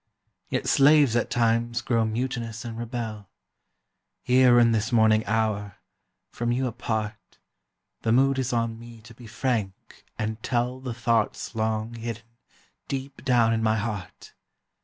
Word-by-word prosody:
Yet - - -2
slaves, 145 -3 +5
at 120 - +1
times, 115 0 +1
grow 115 -2 +1
mutinous 115 0 -3
and 115 -1 -6
rebel. 115 -3 -5 0.9
Here 125 -1 +5
in 115 -1 +5
this 110 +3 0
morning 110 -2 +4
hour, 105 -2 -1 0.6
from 120 0 -2
you 130 +2 0
apart, 110 -2 -4 0.6
The 110 - 0
mood 135 +2 +3
is 130 -1 -1
on 115 -1 -1
me 115 -1 -12
to 115 +2 -14
be 120 0 -13
frank 110 -5 -3
and 110 +1 -3
tell 125 +2 -1
The 125 -3 -5
thoughts 115 -1 0
long 110 0 -2
hidden 115 0 -6 0.6
deep 135 0 -5
down 120 -3 +3
in 110 - 0
my 110 0 +2
heart. 105 -4 -6
115 Hz, 140 wpm, -25 LUFS, 110-120 Hz, 0.9 s, slaves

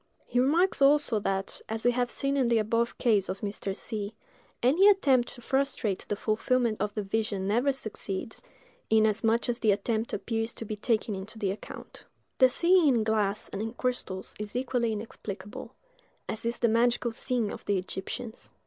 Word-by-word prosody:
He 245 - 0
remarks, 315 +7 +3
also, 275 -5 +5
that, 195 -1 -2
as 225 +1 -4
we 245 - +6
have 245 0 0
seen 275 0 0
in 265 -3 +2
the 235 -1 +3
above 230 +2 0
case 215 -6 +2
of 190 - -4
Mr. 200 -1 -3
C——, 210 -1 -5 0.5
any 320 +11 +5
attempt 270 -11 +4
to 240 - -13
frustrate 260 -6 -1
the 205 - 0
fulfilment 225 +2 0
of 210 0 -2
the 210 - -1
vision 200 -1 -1
never 240 +7 +2
succeeds, 220 -5 -5 0.5
inasmuch 220 +1 +3
as 240 0 -1
the 215 - +3
attempt 220 +3 -1
appears 225 +2 -2
to 225 - -6
be 215 - -4
taken 215 0 0
into 200 +4 -7
the 200 -3 0
account. 200 - -9 0.3
The 260 -1 +7
seeing 345 +4 +4
in 240 -5 +3
glass 215 -2 +1
and 200 - -5
in 225 +1 -3
crystals 245 -7 -3
is 210 +1 -6
equally 245 -2 0
inexplicable; 205 -2 -7 0.5
as 220 +1 -4
is 235 - -1
the 235 - +2
magical 235 +1 +2
seeing 230 -2 0
of - - -9
the 200 - +1
Egyptians. 190 +5 -6
225 Hz, 175 wpm, -28 LUFS, 210-245 Hz, 0.5 s, The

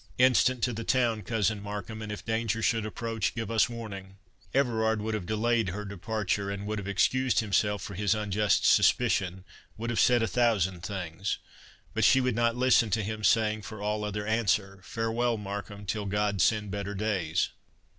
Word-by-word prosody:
Instant 125 -1 +4
to 125 - +1
the 115 +1 -4
town, 115 -3 +1
Cousin 110 -2 0
Markham; 105 +1 -6
and 105 -1 -5
if 100 -3 -7
danger 115 0 -1
should 110 -2 +1
approach, 115 +1 -3
give 115 -1 -4
us 115 +1 +3
warning." 100 -5 -8 0.3
Everard 110 -5 +1
would 110 +1 -3
have 100 -5 -3
delayed 110 0 +1
her 105 +4 -5
departure, 100 0 -2
would 105 +1 -4
have 100 - -7
excused 125 +6 +2
himself 105 -1 +1
for 100 - -6
his 105 +2 +1
unjust 105 -1 +1
suspicion, 95 0 +3 0.3
would 115 +2 -3
have 115 - -1
said 120 -2 +4
a - - +1
thousand 105 -8 +1
things; 95 -1 -3 0.6
but 110 - 0
she 135 +5 +6
would 125 -3 0
not 115 0 +2
listen 125 -2 +4
to 105 +2 0
him, 110 +1 -5
saying, 110 +2 +3
for 110 0 -9
all 105 +1 -2
other 105 0 -3
answer,—"Farewell, 115 +2 0
Markham, 100 0 -6
till 105 +1 -2
God 100 0 0
send 105 -2 +2
better 100 0 -4
days!" 95 -5 0
105 Hz, 175 wpm, -28 LUFS, 100-115 Hz, 0.6 s, she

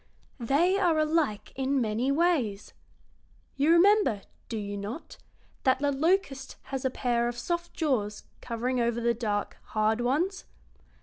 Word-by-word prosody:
"They 320 +11 +2
are 345 -5 +3
alike 310 -8 0
in 270 +1 0
many 235 +3 0
ways. 275 - 0 0.8
You 290 +4 +3
remember, 340 - +4 0.3
do 225 - -3
you 205 -1 -4
not, 205 +10 -7 0.4
that 260 -1 +3
the 285 +1 0
locust 280 -2 0
has 270 -1 -5
a 260 - +2
pair 240 -2 0
of 240 0 -4
soft 345 +3 -3
jaws 230 -10 -1 0.2
covering 245 +2 -2
over 235 0 +1
the 235 0 +2
dark, 210 -3 -2
hard 215 +2 0
ones? 320 +11 0
260 Hz, 140 wpm, -28 LUFS, 230-320 Hz, 0.8 s, remember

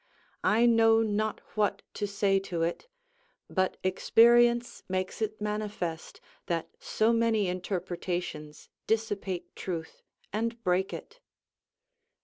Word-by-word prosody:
I 225 +3 +4
know 225 -1 +5
not 215 0 -1
what 205 -2 +1
to 205 - -2
say 200 -1 +2
to 180 -4 -3
it; 170 - -2 0.6
but 185 -1 0
experience 235 +5 +4
makes 185 +3 -2
it 215 0 -2
manifest, 210 -6 -4 0.3
that 165 -2 -1
so 220 +2 +1
many 225 -3 +2
interpretations 175 -4 -4 0.2
dissipate 205 -5 -2
truth 165 -3 -5 0.3
and 230 +2 -2
break 185 0 +1
it. 455 +3 -9
205 Hz, 110 wpm, -29 LUFS, 185-225 Hz, 0.6 s, know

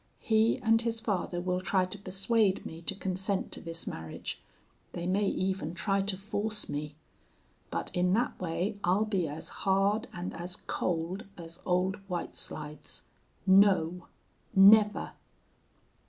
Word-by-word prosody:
He 220 0 +3
and 225 0 +4
his 230 -1 -1
father 185 -5 -1
will 180 +1 -1
try 185 0 +2
to 185 +2 -7
persuade 195 +1 +1
me 165 +1 -7
to 185 +4 -2
consent 190 0 -1
to - - -4
this 165 0 -6
marriage. 80 -1 -6 0.5
They 175 - -4
may 195 +3 +2
even 185 -4 -1
try 195 +2 +1
to 195 -1 +1
force 210 +1 -2
me. 145 0 -4 0.7
But - - -3
in 180 0 +2
that 235 -1 0
way 185 +4 -2
I'll 190 +5 +3
be 195 -6 0
as 150 +2 -6
hard 200 +4 +2
and 175 0 -5
as 175 +1 -6
cold 175 +4 -2
as 165 -1 -10
Old 185 +2 +1
White 175 -1 -3
Slides. 150 -1 -6 0.4
No! 190 -3 +4 0.5
Never! 210 +2 +6
190 Hz, 140 wpm, -30 LUFS, 175-205 Hz, 0.7 s, Never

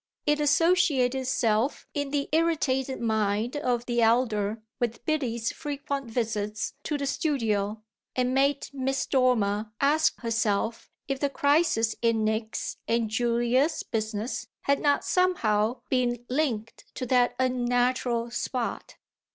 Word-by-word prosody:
It 295 0 +2
associated 295 -4 +3
itself 255 -2 0
in 285 -2 -2
the 280 0 -1
irritated 290 -5 +1
mind 220 +1 0
of 245 -4 -1
the 240 -1 0
elder 225 -2 +2 0.2
with 240 0 -2
Biddy's 240 -7 -1
frequent 280 -3 -4
visits 215 -2 -2
to 300 - -1
the 280 - -3
studio 220 -8 -1 0.3
and 255 0 +1
made 275 +1 +2
Miss 270 0 -1
Dormer 220 -5 +1
ask 310 +3 +2
herself 225 -1 -1 0.2
if 275 -1 -2
the 285 - +1
crisis 285 -6 +2
in 230 -2 +2
Nick's 220 +1 -2
and 230 -2 0
Julia's 240 +6 +1
business 220 +1 -3
had 280 0 +1
not 285 -2 +2
somehow 240 - +1
been 245 -2 0
linked 250 -6 -2
to 255 - -3
that 245 0 +3
unnatural 245 -1 +1
spot. 240 0 -3
245 Hz, 125 wpm, -27 LUFS, 225-280 Hz, 0.3 s, associated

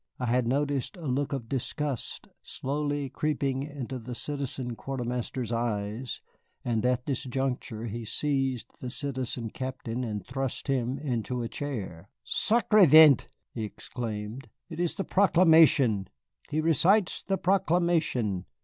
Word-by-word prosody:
I 125 - -2
had 120 0 +1
noticed 140 - 0
a 170 - -8
look 140 +1 0
of 135 -5 -3
disgust 135 +1 -3
slowly 145 +1 -2
creeping 135 -1 -1
into 135 -3 -5
the 120 +1 -7
Citizen 135 -3 -3
Quartermaster's 125 -2 -3
eyes, 115 0 -2 0.4
and 115 -3 0
at 125 0 0
this 135 -4 -1
juncture 125 -3 -2
he 115 +1 -4
seized 135 +1 -1
the 125 - -5
Citizen 125 -4 -3
Captain 130 -2 -4
and 105 -5 -4
thrust 135 -1 -3
him 130 -1 0
into 125 -3 -2
a - - -2
chair. 105 - -5 0.2
"Sacré 215 -4 +4
vent!" 155 -2 +8 0.3
he 115 - -3
exclaimed, 110 +2 -6 0.2
"it 160 - -6
is 175 -1 0
the 195 - -2
proclamation 160 - +5 0.4
he 155 - 0
recites 170 +6 +3
the 195 0 -1
proclamation! 170 - +1
130 Hz, 130 wpm, -28 LUFS, 120-145 Hz, 0.4 s, vent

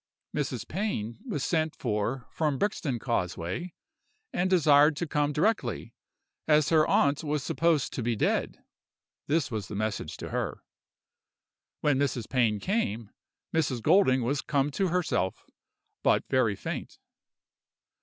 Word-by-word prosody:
"Mrs. 135 -6 -2
Pain 120 - -3
was 145 - -2
sent 160 -2 0
for 115 +2 -2
from 150 -4 0
Brixton 155 - -1
Causeway, 105 - -3 0.6
and 185 +1 +1
desired 150 -4 +5
to 170 - -1
come 150 -1 0
directly, 210 +10 0 0.5
as 150 -2 +4
her 155 -2 +4
aunt 140 +3 +2
was 150 -2 -1
supposed 165 -3 +1
to - - -3
be 120 0 0
dead: - - -1 0.6
this 150 -2 +1
was 110 -3 -3
the 105 - -6
message 105 -6 -3
to - - -7
her. - - -3 1.2
When 145 -3 +2
Mrs. 125 -5 -1
Pain 115 -5 +2
came, 115 - -1 0.4
Mrs. 135 -8 0
Golding 130 - +4
was 135 +3 0
come 140 +2 0
to 190 +6 0
herself, 170 - -1 0.6
but - - +3
very 125 -6 +3
faint. - - -6
140 Hz, 135 wpm, -28 LUFS, 115-160 Hz, 1.2 s, desired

